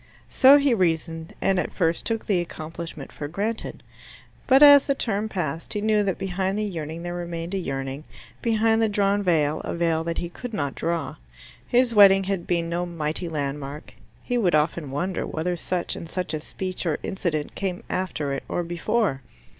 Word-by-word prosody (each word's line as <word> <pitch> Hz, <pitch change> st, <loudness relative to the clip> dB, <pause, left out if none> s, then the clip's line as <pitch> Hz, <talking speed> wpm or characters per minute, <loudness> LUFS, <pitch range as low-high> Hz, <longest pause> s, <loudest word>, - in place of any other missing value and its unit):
So 270 Hz, +2 st, +7 dB
he 280 Hz, -3 st, +3 dB
reasoned, 165 Hz, -4 st, -1 dB
and 190 Hz, -1 st, +2 dB
at -, -, -2 dB
first 165 Hz, -3 st, 0 dB
took 225 Hz, -1 st, -2 dB
the 195 Hz, -4 st, +2 dB
accomplishment 165 Hz, -3 st, -7 dB
for 145 Hz, -, -6 dB
granted. 205 Hz, +8 st, -4 dB, 0.6 s
But 270 Hz, +2 st, +7 dB
as 285 Hz, -1 st, +9 dB
the 275 Hz, -, +2 dB
term 220 Hz, -3 st, -1 dB
passed 165 Hz, -5 st, -3 dB
he -, -, 0 dB
knew 215 Hz, 0 st, +3 dB
that 195 Hz, -2 st, -1 dB
behind 190 Hz, +1 st, -2 dB
the 215 Hz, -, 0 dB
yearning 165 Hz, -4 st, -5 dB
there 175 Hz, 0 st, -4 dB
remained 170 Hz, 0 st, -5 dB
a 195 Hz, -, 0 dB
yearning, 135 Hz, -2 st, -4 dB, 0.4 s
behind 225 Hz, -1 st, +2 dB
the 220 Hz, -, +3 dB
drawn 205 Hz, 0 st, +2 dB
veil 155 Hz, -5 st, +1 dB
a -, -, -3 dB
veil 165 Hz, -1 st, +1 dB
that 170 Hz, 0 st, -2 dB
he 175 Hz, -, -2 dB
could 230 Hz, +6 st, -7 dB
not 140 Hz, -5 st, -2 dB
draw. 165 Hz, -4 st, -2 dB, 0.5 s
His 245 Hz, -1 st, +3 dB
wedding 195 Hz, -2 st, +7 dB
had 190 Hz, -2 st, -3 dB
been 170 Hz, -2 st, 0 dB
no 175 Hz, +1 st, -2 dB
mighty 165 Hz, 0 st, -3 dB
landmark: 145 Hz, -1 st, -4 dB, 0.3 s
he 245 Hz, 0 st, 0 dB
would 180 Hz, -7 st, +3 dB
often 155 Hz, 0 st, 0 dB
wonder 175 Hz, +7 st, -2 dB
whether 175 Hz, +3 st, -2 dB
such 175 Hz, +1 st, -2 dB
and 165 Hz, -, -8 dB
such 180 Hz, -1 st, -3 dB
a 155 Hz, -, -2 dB
speech 185 Hz, +3 st, -5 dB
or 155 Hz, -, +1 dB
incident 165 Hz, -6 st, -2 dB
came 185 Hz, -3 st, -3 dB
after 155 Hz, -6 st, -2 dB
it 135 Hz, -, -3 dB
or 175 Hz, -, -1 dB
before. 175 Hz, -, 0 dB
175 Hz, 185 wpm, -24 LUFS, 160-205 Hz, 0.6 s, as